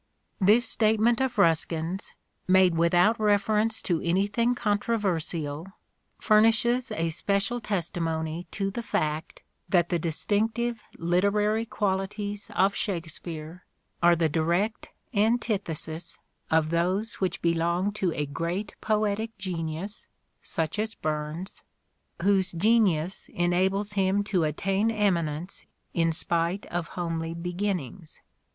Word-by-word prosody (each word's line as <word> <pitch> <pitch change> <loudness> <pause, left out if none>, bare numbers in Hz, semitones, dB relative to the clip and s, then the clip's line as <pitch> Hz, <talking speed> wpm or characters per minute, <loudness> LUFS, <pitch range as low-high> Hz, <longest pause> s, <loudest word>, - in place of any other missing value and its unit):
This 220 +5 +4
statement 220 +2 +3
of 265 -2 -1
Ruskin's, 165 +2 +1 0.3
made 185 -1 +5
without 175 +7 +4
reference 215 +1 +2
to 170 -3 0
anything 205 +7 +1
controversial, 180 -8 -1 0.5
furnishes 225 +4 +3
a 165 0 -1
special 200 +8 -1
testi 175 -5 -2
mony 160 +1 -2
to 195 +2 -2
the 235 - -4
fact 155 -7 -2 0.3
that 175 -2 +3
the 175 - +1
distinctive 220 +8 -1 0.2
literary 205 +6 +1
qualities 205 0 -2
of 195 +1 +4
Shakespeare 165 -2 -5 0.4
are 175 0 +6
the 165 -1 +2
direct 170 +8 0 0.2
antithesis 200 -7 -1 0.3
of 160 0 +2
those 185 +7 0
which 185 - 0
belong 170 +3 +1
to 195 -4 -1
a 150 - -1
great 170 +8 -3
poetic 215 +1 0
genius, 180 +1 -5 0.3
such 160 +2 -3
as 220 +1 -2
Burns, 155 +4 -4 0.6
whose 190 -1 +3
genius 190 -3 +2
enables 190 +4 +1
him 195 0 +2
to 190 -5 +1
attain 195 +8 0
eminence 180 -6 -1 0.3
in 165 -1 +2
spite 170 +3 -1
of 170 -1 -2
homely 165 -1 -2
beginnings. 175 -2 -4
190 Hz, 110 wpm, -27 LUFS, 165-210 Hz, 0.6 s, are